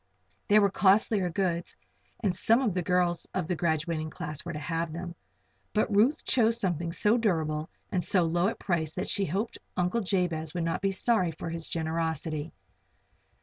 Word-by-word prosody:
There 210 0 +6
were 200 - +3
costlier 195 -1 +3
goods, 175 -1 -1 0.5
and 195 -4 +1
some 230 +6 +4
of 235 -8 +1
the 180 - 0
girls 175 -1 +1
of 185 -4 -1
the 180 - 0
graduating 160 -1 -1
class 155 -3 -6
were 170 - -5
to 155 - -5
have 165 +1 -2
them; 170 +1 -5 0.6
but 215 -1 +1
Ruth 235 +9 +3
chose 230 -2 +3
something 170 -3 -1
so 210 +7 +3
durable 160 -7 0 0.2
and 185 -3 +1
at - - -5
so 185 -3 +4
low 175 +3 +2
a 225 - -1
price 160 -4 -2
that 185 - -2
she 200 - 0
hoped 205 +9 -2 0.2
Uncle 180 +6 +1
Jabez 175 -5 -1
would 175 - 0
not 165 0 -1
be 195 0 +1
sorry 195 -2 +2
for 165 0 -6
his 165 -1 -5
generosity. 160 -1 -2
175 Hz, 185 wpm, -29 LUFS, 165-200 Hz, 0.6 s, There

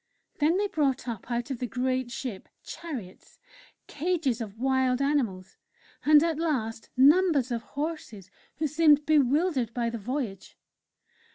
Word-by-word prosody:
Then 315 +4 +3
they 410 +1 +1
brought 275 -8 -1
up 230 -1 -6
out 240 +2 -2
of 255 - -4
the 250 - -2
ship - - -20 0.8
great - - -49
chariots, 275 - -8 0.5
cages 300 -6 -1
of 215 -2 -7
wild 260 0 +1
animals, 230 -10 -1 0.5
and 300 0 +7
at 330 -2 -1
last 245 -9 -2
numbers 290 -2 +4
of 235 -1 -1 0.2
horses, 285 - -5 0.2
who 315 - -2
seemed 300 -1 +4
bewildered 285 - +2
by 235 -1 -1
the 230 - -5
voyage. 225 -4 -5
270 Hz, 140 wpm, -27 LUFS, 235-310 Hz, 0.8 s, and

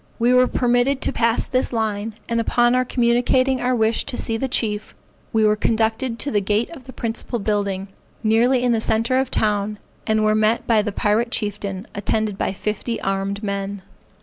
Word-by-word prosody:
We 240 +1 +3
were 250 0 +5
permitted 245 +3 +1
to - - 0
pass 230 0 +1
this 255 0 0
line, 220 -2 -2
and 230 0 0
upon 240 +1 +3
our 255 0 +3
communicating 250 +2 +2
our 250 0 +1
wish 220 -1 +1
to 245 - -3
see 225 - -2
the 265 +4 -1
chief, 215 -4 -1 0.4
we 220 -1 +3
were 210 0 +4
conducted 225 +3 0
to 285 - -2
the 205 - +2
gate 210 - 0
of 275 -6 -11
the 260 - -9
principal 235 0 -3
building, 200 -2 -1 0.4
nearly 240 +4 +3
in 245 - +2
the 225 -1 +1
centre 230 +4 +1
of 265 - -1
the - - -2
town, 210 -1 0 0.3
and 220 0 +2
were 215 0 +3
met 215 +2 +2
by 225 -3 +3
the 210 0 -3
Pirate 215 +4 +1
Chieftain 205 -3 -3
attended 210 0 -1
by - - -1
fifty 210 +4 -3
armed 195 +1 -2
men. 200 -1 -3
225 Hz, 195 wpm, -21 LUFS, 210-245 Hz, 0.4 s, were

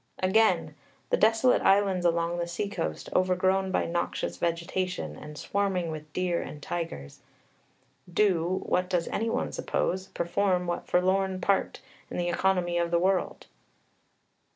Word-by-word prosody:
Again, 215 +4 +2 0.4
"The - - +4
desolate 225 - +4
islands 195 -3 +3
along 170 +1 0
the 170 - -1
sea 175 +4 -3
coast, 185 -5 -4
overgrown 185 +1 +2
by - - +1
noxious 170 +1 -2
vegetation, 170 - -2
and 150 - -10
swarming 190 -4 -1
with 155 -1 -8
deer 180 +1 0
and 150 - -7
tigers" 145 - -5 0.9
do, 185 -2 +1
what 180 0 0
does 175 -2 0
any 225 +2 -1
one 245 +3 -1
suppose, 190 +1 -1
perform 180 +1 0
what 175 0 -3
forlorn 190 +1 +1
part 195 +1 0 0.3
in - - -5
the 175 0 0
economy 175 -1 +1
of 170 0 0
the 170 - +2
world? 185 +1 0
180 Hz, 140 wpm, -28 LUFS, 170-190 Hz, 0.9 s, The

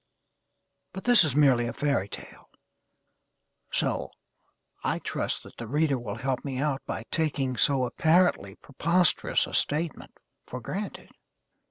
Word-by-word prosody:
But 190 - -6
this 245 -5 +6
is 145 -4 0
merely 130 -5 +4
a 120 - -4
fairy 140 -8 0
tale; - - -11 1.2
so, - - 0 0.7
I - - 0
trust - - -3
that - - -14
the 115 - -6
reader 145 +1 +1
will 115 -3 -5
help 130 +2 -2
me 135 -3 -4
out 140 0 0
by 110 - -3
taking 140 -5 0
so 130 +2 +2
apparently 160 - +2
preposterous 170 +8 +1
a - - -10
statement 155 +1 -1 0.3
for 125 - -6
granted. 195 - -6
140 Hz, 135 wpm, -27 LUFS, 125-160 Hz, 1.2 s, this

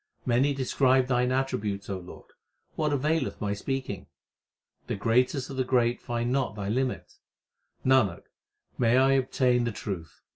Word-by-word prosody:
Many 130 +4 +2
describe 130 -1 +3
Thine 125 0 +1
attributes, 105 -7 -1
O 95 -2 -3
Lord; 90 0 -12 0.5
what 155 -2 0
availeth 150 +1 0
my 100 -1 -1
speaking? 130 -2 -4 0.8
The - - -2
greatest 125 +6 +1
of 135 - -7
the 130 - +2
great 120 -2 +1
find 120 0 -2
not 130 -6 0
Thy 100 -2 -4
limit. 130 +3 -2 0.7
Nanak, 130 -9 +3 0.6
may 120 +1 +4
I 135 +1 +5
obtain 130 -2 +2
the 120 - -1
truth 95 -6 -6
125 Hz, 145 wpm, -27 LUFS, 110-135 Hz, 0.8 s, I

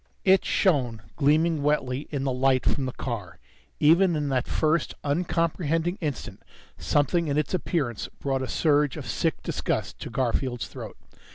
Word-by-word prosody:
It 190 0 +5
shone, 125 - +1
gleaming 155 +2 +3
wetly, 140 -2 0
in 140 -3 -3
the 135 - 0
light 130 0 +2
from 135 -2 +1
the - - -3
car. 105 -11 -5 0.4
Even 170 +3 +5
in 145 -2 -1
that 130 -2 0
first 155 0 +1
uncomprehending 165 +2 0
instant, 135 - -4 0.3
something 155 +4 +1
in 145 0 0
its 150 +2 -1
appearance 140 - -1
brought 135 -1 -1
a 130 - -3
surge 145 -2 +2
of - - -6
sick - - -1
disgust - - -2
to - - -6
Garfield's 125 0 -1
throat. - - -9
145 Hz, 155 wpm, -26 LUFS, 130-165 Hz, 0.4 s, It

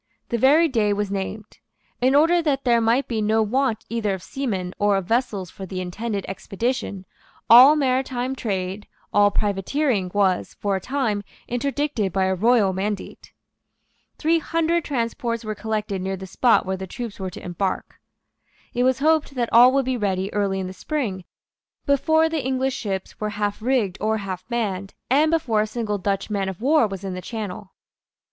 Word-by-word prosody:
The 235 - 0
very 295 +7 +5
day 220 -7 +1
was 205 -1 -2
named. 200 +2 -5 0.4
In 260 +2 +3
order 330 +4 +5
that 280 -4 0
there 235 -2 +3
might 235 +5 +2
be 225 -3 -2
no 220 +1 +2
want 240 0 0
either 215 -4 -1
of 185 - -10
seamen 195 -10 -3
or 205 -1 +3
of 195 - -3
vessels 215 -5 -1
for 190 - -8
the 185 0 -5
intended 200 +3 -4
expedition, 200 0 -3 0.5
all 255 +6 +10
maritime 260 -2 0
trade, 195 -3 -3 0.3
all 205 0 +5
privateering 205 +2 0
was, 195 -2 +1
for 200 -1 -1
a 190 - -3
time, 235 -4 -1 0.3
interdicted 270 -4 -1
by 190 +1 +1
a 190 - +1
royal 210 0 +3
mandate. 200 +2 -4 0.9
Three 330 +1 +2
hundred 330 +1 0
transports 230 -3 -2
were 215 - -2
collected 210 -2 -3
near 190 +1 -3
the 190 - -8
spot 235 +5 +3
where 190 0 -2
the 190 0 -6
troops 230 +1 -7
were 190 -1 -3
to 180 - -10
embark. 180 +2 -3 0.7
It 245 - +1
was 260 0 +3
hoped 310 -2 +2
that 240 -2 -2
all 245 +2 +8
would 275 -1 +2
be 260 -1 -1
ready 195 -2 -1
early 200 -2 0
in 190 - -3
the 185 - -6
spring, 205 - -3 0.6
before 315 +3 +3
the 320 -3 -2
English 260 +1 0
ships 195 -8 -4
were 215 - -2
half 205 0 -2
rigged 225 -6 0
or 220 +1 +1
half 190 -3 -5
manned, 200 -5 -2 0.2
and 300 +4 +4
before 255 -10 +1
a 215 - -1
single 215 -2 -3
Dutch 195 +1 -1
man 195 -2 -1
of 190 - -7
war 270 0 +3
was 195 -1 -7
in 190 -1 -4
the 185 - -5
Channel. 210 -2 -6
220 Hz, 180 wpm, -23 LUFS, 195-260 Hz, 0.9 s, all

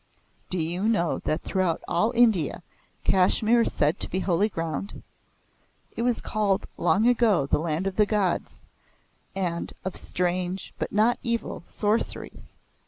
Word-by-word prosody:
Do 185 - -2
you 175 +6 0
know 175 -7 +1
that 155 - 0
throughout 185 -4 0
all 215 +6 +2
India 220 - +2 0.4
Kashmir 215 +5 +3
is - - 0
said 150 +2 +1
to - - -3
be 185 - -1
holy 195 +4 +2
ground? 165 +1 -4 0.9
It - - -3
was 245 -1 +1
called 205 -3 0
long 210 +4 +2
ago 230 - +3
the 140 - +1
land 160 +3 -1
of 195 -1 -3
the 210 -1 +4
gods, 205 -5 -1 0.7
and 175 -3 -2
of 190 - -3
strange, 180 +1 -2
but - - -2
not 220 +4 +3
evil, 235 -2 -2
sorceries. 215 +2 -3
190 Hz, 145 wpm, -26 LUFS, 175-215 Hz, 0.9 s, the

